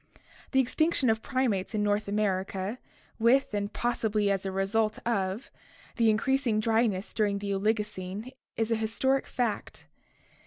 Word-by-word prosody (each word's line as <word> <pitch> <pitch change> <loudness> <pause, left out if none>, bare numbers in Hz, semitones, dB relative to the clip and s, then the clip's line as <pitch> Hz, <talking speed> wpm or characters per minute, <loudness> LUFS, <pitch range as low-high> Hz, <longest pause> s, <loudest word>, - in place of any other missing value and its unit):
The 265 - +3
extinction 265 0 +2
of 220 0 -1
primates 235 -7 -1
in 210 - +1
North 205 0 +1
America, 200 +1 -1 0.4
with, 235 +2 +3
and 205 0 -1
possibly 215 -4 0
as 195 0 -1
a - - -2
result 215 +3 +1
of, 200 +1 -1 0.5
the 230 -2 +4
increasing 235 0 +2
dryness 220 -3 +1
during 205 -2 +1
the 200 0 -2
Oligo 210 +2 +1
cene 205 +3 -7 0.3
is 225 0 0
an 225 - +3
historic 265 +5 +1
fact. 235 -4 -3
215 Hz, 145 wpm, -29 LUFS, 200-235 Hz, 0.5 s, the